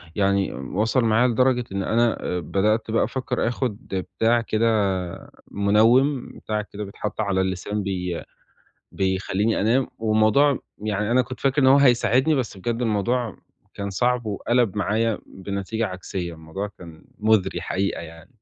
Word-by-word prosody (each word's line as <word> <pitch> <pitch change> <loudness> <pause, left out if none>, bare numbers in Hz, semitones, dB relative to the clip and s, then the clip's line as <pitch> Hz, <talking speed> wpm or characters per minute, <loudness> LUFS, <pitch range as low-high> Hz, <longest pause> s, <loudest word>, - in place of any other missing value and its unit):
يعني 100 -1 +1
وصل 110 - 0
معايا 115 +2 +4
لدرجة 125 +1 +2
إن 100 0 -2
أنا 115 +3 +1
آآ 90 - -1
بدأت 105 +7 0
بقى 115 - +3
أفكّر 130 -3 -2
آخُد 120 -3 -2 0.4
بتاع 115 +1 +3
كده 115 0 0 0.9
مِنوِّم، 115 +7 +3 0.2
بتاع 105 -1 -1
كده 105 0 -7
بيتحَط 105 +1 -4
على 100 -3 +1
اللسان 95 +3 -2
بي 90 -3 -3 0.7
بيخلّيني 95 +3 0
أنام، 120 +5 +2
والموضوع 110 +6 +3 0.2
يعني 105 0 -2
أنا 125 +2 +4
كنت 130 +1 -9
فاكر 135 +1 +2
إن - - +5
هو 135 +1 +7
هيساعدني، 130 +2 +4
بس 125 -7 -2
بجد 120 +5 -2
الموضوع 115 +1 0 0.4
كان 100 0 -4
صعب 120 +3 0
وقَلَب 110 +1 0
معايا 110 +2 0
بنتيجة 100 +4 -3
عكسية، 90 -2 -5
الموضوع 80 +6 -6
كان 85 -3 -12
مُزري 110 -2 +2
حقيقة 95 +1 -2
يعني. 80 0 -12
110 Hz, 145 wpm, -23 LUFS, 100-120 Hz, 0.9 s, هو